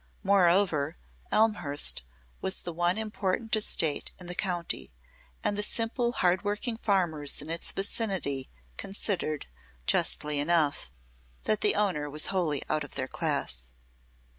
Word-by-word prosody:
Moreover, 175 -5 +3 0.3
Elmhurst 175 - +2 0.4
was 190 - +1
the 175 - -5
one 175 +3 +1
important 220 0 -1
estate 165 -8 +2
in 180 - -7
the 180 - -4
county, 175 - -2 0.5
and 205 - +1
the 205 - 0
simple, 230 +3 0
hard 180 -3 +2
working 210 +3 -2
farmers 175 -10 +1
in 150 +3 -4
its 165 - 0
vicinity 190 - -1 0.3
considered, 185 -6 -1 0.4
justly 150 - +2
enough, 150 - +2 0.5
that 215 0 +1
the 210 - +5
owner 180 -8 +1
was 150 +2 +2
wholly 165 -7 +1
out 155 - 0
of 145 - -11
their 130 - -1
class. - - -1
175 Hz, 130 wpm, -29 LUFS, 150-205 Hz, 0.5 s, the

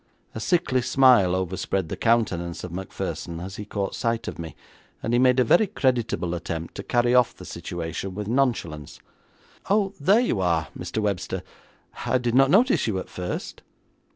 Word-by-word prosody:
A - - -5
sickly 130 -3 +1
smile 120 -8 +5
overspread 95 -1 -2
the - - -3
countenance 95 -8 0
of 90 - -6
Macpherson 85 -2 -5
as 95 +2 -7
he 105 - -6
caught 100 -1 -3
sight 115 -1 -1
of - - -6
me, 80 -3 -7 0.5
and 115 - -1
he 120 - +4
made 130 0 +4
a - - +6
very 175 - +4
creditable 120 - 0
attempt 85 -1 -5
to - - -6
carry 120 0 +2
off 125 -1 +4
the - - -11
situation 85 +2 -5
with 105 0 -4
nonchalance. 110 - -1 0.7
'Oh, 200 -1 +2
there 195 +10 +4
you 240 - 0
are, 85 -3 +1
Mr. 90 +4 -6
Webster; 100 -4 -2 0.6
I 130 - +3
did 120 -2 -1
not 135 +1 +5
notice 235 - +4
you 105 -4 0
at 95 - -5
first.' 90 -1 -5
110 Hz, 175 wpm, -25 LUFS, 90-125 Hz, 0.7 s, a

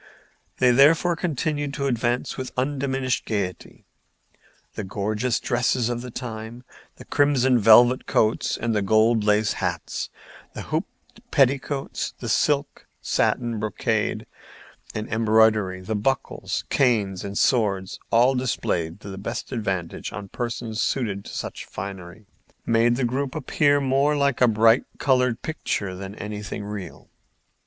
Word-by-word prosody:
They 125 -1 +4
therefore 160 +7 +5
continued 145 -3 -2
to 140 - -2
advance 120 -1 -1
with 130 -1 -6
undiminished 130 -1 -1
gayety. 100 -5 -4 0.9
The 110 - -5
gorgeous 105 +5 -1
dresses 120 0 0
of 120 -1 -2
the 125 - -7
time—the 120 0 -9
crimson 130 -3 +3
velvet 120 +4 +6
coats, 110 0 +1
the 110 -2 0
gold 110 +2 +3
laced 105 0 +2
hats, - - -3 0.5
the - - -5
hoop - - -1 0.4
petticoats, 135 +1 0
the 120 - -5
silk, 145 +4 0
satin, 120 -3 0
brocade 105 -1 -1 0.7
and 110 0 -3
embroidery, 110 -4 +3
the 95 +4 -4
buckles, 130 +6 -2
canes 105 -8 +1
and 100 0 -5
swords, 100 -7 +1
all 120 +3 +4
displayed 100 -9 -2
to 100 - -9
the 95 - -7
best 100 - -5
advantage 95 -8 -3
on 100 0 -7
persons 115 -1 -4
suited 105 -7 -1
to - - -8
such - - -5
finery—made 105 +5 -3
the 130 0 0
group 130 +2 -2
appear 145 -1 +2
more 140 +2 +2
like 140 -3 +1
a 125 - +7
bright 115 +2 +4
colored 125 -4 +1
picture 100 -11 -3
than 95 +2 -7
anything 105 -1 -6
real. 100 -2 -8
115 Hz, 130 wpm, -24 LUFS, 105-130 Hz, 0.9 s, a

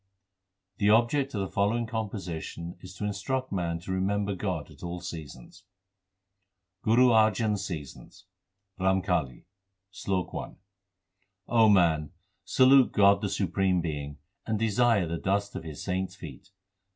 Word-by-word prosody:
The 100 - +3
object 120 +5 +2
of 100 - -1
the 95 - -2
following 105 +5 0
composition 95 -6 -5
is 90 0 -11
to 105 - -7
in 105 - -1
struct 130 +6 -3
man 85 -3 -1
to 95 - -6
remember 100 +2 0
God 95 - -4
at - - -16
all 85 0 -5
seasons: 80 +1 -9 1.2
GURU 120 +3 +4
ARJAN 110 -1 +3
S 100 -1 -3
SEASONS 75 -7 -9 0.5
RAMKALI 90 -8 0 0.5
SLOK 95 -1 -3
I - - -6 0.9
O 115 -2 +5
man, 80 -7 +3 0.3
salute 130 0 +5
God 100 -1 +4
the 100 - -1
Supreme 95 -1 0
Being, 75 -3 -4 0.3
and 110 -1 0
desire 115 -2 +2
the 85 0 -4
dust 100 +1 -1
of - - -5
His 80 -3 -8
saints 95 0 -2
feet. 80 -3 -11
95 Hz, 140 wpm, -28 LUFS, 85-110 Hz, 1.2 s, O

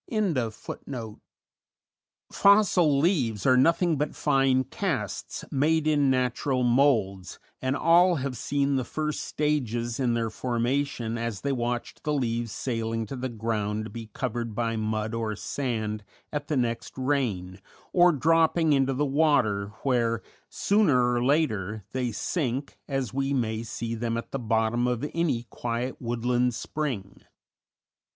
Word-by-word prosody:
_ 130 - -3 1.1
"Fossil 195 -7 +5
leaves" 135 - +1
are 130 - +6
nothing 165 +4 +3
but 150 +1 -2
fine 135 -2 +3
casts, - - -3
made 155 +3 +2
in 145 -3 +3
natural 130 0 +1
moulds, 120 -8 +2 0.2
and 130 +1 0
all 175 +4 +5
have 135 -3 -3
seen 140 +1 0
the 130 - 0
first 155 +4 -3
stages 120 -6 -1
in 120 -3 +1
their 115 -1 -1
formation 120 0 -1
as 115 -4 -3
they 140 - -1
watched 120 -2 -3
the 150 - 0
leaves 120 -4 -1
sailing 115 -2 -2
to 120 - -6
the 130 0 -3
ground 110 -2 -2
to - - -7
be 115 -2 -7
covered 120 -2 -3
by 115 0 -1
mud 110 0 -2
or 115 -2 -2
sand 110 -4 -3 0.3
at 145 0 -3
the 150 - 0
next 115 -1 -2
rain, 115 -10 -1 0.3
or 175 0 +6
dropping 160 +1 +3
into 135 -1 +2
the 145 +3 +1
water, 140 -9 +2 0.2
where 115 -4 +1 0.3
sooner 145 - +3
or 120 0 +1
later 110 - 0
they 125 -2 -1
sink, 135 - -2
as 135 -5 -2
we 135 +1 0
may 110 -3 -1
see 115 0 -4
them 115 0 -2
at 115 - -6
the 135 - -2
bottom 115 +1 +1
of 125 +2 -1
any 155 -8 0
quiet 120 +2 -3
woodland 120 +1 0
spring. 125 -7 -4
125 Hz, 140 wpm, -27 LUFS, 115-145 Hz, 1.1 s, are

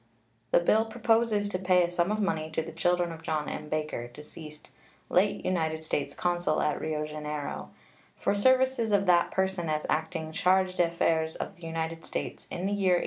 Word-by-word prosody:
The - - +5
bill 215 +6 +3
proposes 225 -2 +2
to 185 - -2
pay 180 -1 +4
a 175 - -1
sum 175 +2 +1
of 215 - 0
money 160 -6 0
to 160 - 0
the 165 - -7
children 175 +1 +1
of 165 0 -8
John 155 -2 -2
M. 150 0 -5
Baker, 150 -6 -2
deceased, 150 +4 -11 0.4
late 195 +3 +2
United 160 -3 0
States 140 -2 -2
consul 175 -3 0
at 150 - 0
Rio 155 -1 -2
Janeiro, 150 -1 -5 0.5
for - - +1
services 260 +1 +3
of 200 -1 +3
that 175 -2 +4
person 190 -3 -1
as 155 0 -1
acting 160 0 -1
chargé 185 +3 +2
d'affaires 165 -2 +1
of 195 - -5
the 175 -2 -9
United 165 0 -3
States - - -5
in 180 - -4
the 200 - 0
year 195 -3 +3
1834. - - +2
170 Hz, 190 wpm, -29 LUFS, 155-190 Hz, 0.5 s, The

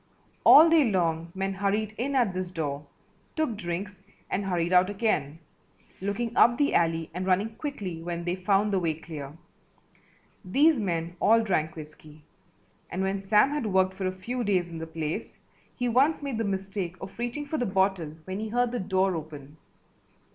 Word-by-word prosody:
All 315 +3 +9
day 320 -7 +4
long 165 -3 0
men 195 0 -2
hurried 205 +2 -1
in 270 +5 -2
at 240 -7 +2
this 185 0 -3
door, 150 -4 -4 0.5
took 310 -8 0
drinks 185 +1 -5 0.3
and 200 - 0
hurried 175 -2 -1
out 180 +1 +5
again, 195 -8 -1 0.6
looking 225 +4 -2
up 240 0 +5
the 290 0 +2
alley 165 -1 +1
and 185 +2 -4
running 200 +4 +1
quickly 215 - -5
when 170 0 -4
they 175 0 -1
found 195 +2 +1
the 190 - +3
way 165 -3 0
clear. 155 -2 -9 1.1
These 280 - +3
men 170 -4 -2
all 225 +1 +4
drank 160 -6 0
whiskey, 155 -1 -12 0.7
and 185 +2 -2
when 195 0 -1
Sam 210 +7 +4
had 290 -6 -2
worked 190 -1 +2
for 190 0 -3
a - - 0
few 240 +7 -4
days 185 -5 0
in 165 - -6
the 165 - -6
place 160 +5 -4 0.4
he 245 - -1
once 275 +6 +2
made 270 -5 -3
the 225 - 0
mistake 195 -2 -3
of 190 +4 -10
reaching 245 +5 -3
for 305 +2 -3
the 245 - 0
bottle 190 -5 0
when 190 +1 -4
he 220 0 -4
heard 245 +1 +1
the 245 - -2
door 190 0 +1
open. 150 -2 -8
190 Hz, 180 wpm, -27 LUFS, 170-225 Hz, 1.1 s, All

